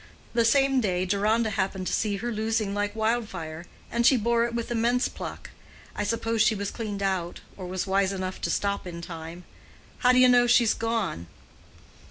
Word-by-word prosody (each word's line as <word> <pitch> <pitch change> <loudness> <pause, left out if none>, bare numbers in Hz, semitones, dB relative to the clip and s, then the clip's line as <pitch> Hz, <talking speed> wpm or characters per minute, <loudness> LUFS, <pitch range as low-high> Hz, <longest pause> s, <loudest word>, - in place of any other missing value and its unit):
The 235 -1 +3
same 270 +2 +3
day 185 -4 0
Deronda 215 +4 +1
happened 190 -2 -2
to - - -2
see 205 -2 0
her 240 +4 -3
losing 220 -2 -1
like 205 +1 -2
wildfire, 195 -8 -2 0.2
and 235 0 +1
she 260 +2 +6
bore 235 +1 +2
it 235 0 -4
with 235 0 -3
immense 240 +2 +1
pluck. - - -8 0.4
I - - -2
suppose 225 +1 0
she 220 - +4
was 200 0 -3
cleaned 205 -4 -4
out, 185 -3 -2
or 185 -2 -7
was 185 0 -3
wise 195 0 +1
enough 185 -1 -4
to - - -1
stop 200 -2 -1
in 170 -1 -7
time. 165 +1 -8 0.6
How 250 - +5
do 255 - +3
you 255 0 +7
know 245 -1 +5
she's 240 -2 +4
gone?" 225 - -2
215 Hz, 190 wpm, -26 LUFS, 190-235 Hz, 0.6 s, you